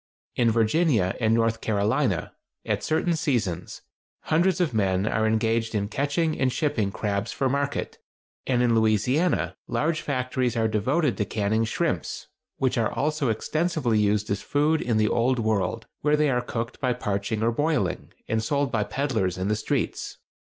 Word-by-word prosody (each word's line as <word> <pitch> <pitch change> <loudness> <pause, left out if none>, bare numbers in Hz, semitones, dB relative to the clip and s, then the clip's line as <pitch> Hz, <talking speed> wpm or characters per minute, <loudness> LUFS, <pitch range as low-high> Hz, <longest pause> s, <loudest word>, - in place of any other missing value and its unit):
In 120 -1 +3
Virginia 115 - +2
and 110 -1 +3
North 115 -1 +1
Carolina, 110 - 0 0.3
at - - -1
certain 165 +2 +1
seasons, 110 - -2 0.4
hundreds 175 +3 +2
of 170 -8 +1
men 95 -3 +1
are 110 0 +1
engaged 115 +1 0
in 100 -1 -1
catching 145 +5 0
and 130 -1 +2
shipping 125 -10 0
crabs 105 +2 -2
for 135 - 0
market, 140 +2 -2 0.5
and 125 -2 +2
in 120 -1 +3
Louisiana 115 - +2
large 155 +1 0
factories 130 -4 -1
are 110 -1 +2
devoted 130 +8 +1
to 105 - 0
canning 110 +2 0
shrimps, 115 - -2 0.3
which 130 -2 +1
are 110 - +1
also 150 -3 0
extensively 150 0 0
used 105 0 +1
as 100 - -1
food 150 +2 +1
in 115 -3 0
the 110 0 +3
Old 125 +3 +2
World, 110 -1 -1
where 150 +1 +2
they 150 -2 +2
are 125 -1 +1
cooked 115 +1 -5
by 125 -3 +1
parching 105 -1 -2
or 115 - +3
boiling, 145 - -1 0.2
and 110 0 0
sold 140 +1 0
by 110 -2 +1
peddlers 110 -10 -1
in 95 +2 -2
the 105 - +2
streets. 110 - -2
115 Hz, 165 wpm, -25 LUFS, 110-145 Hz, 0.5 s, In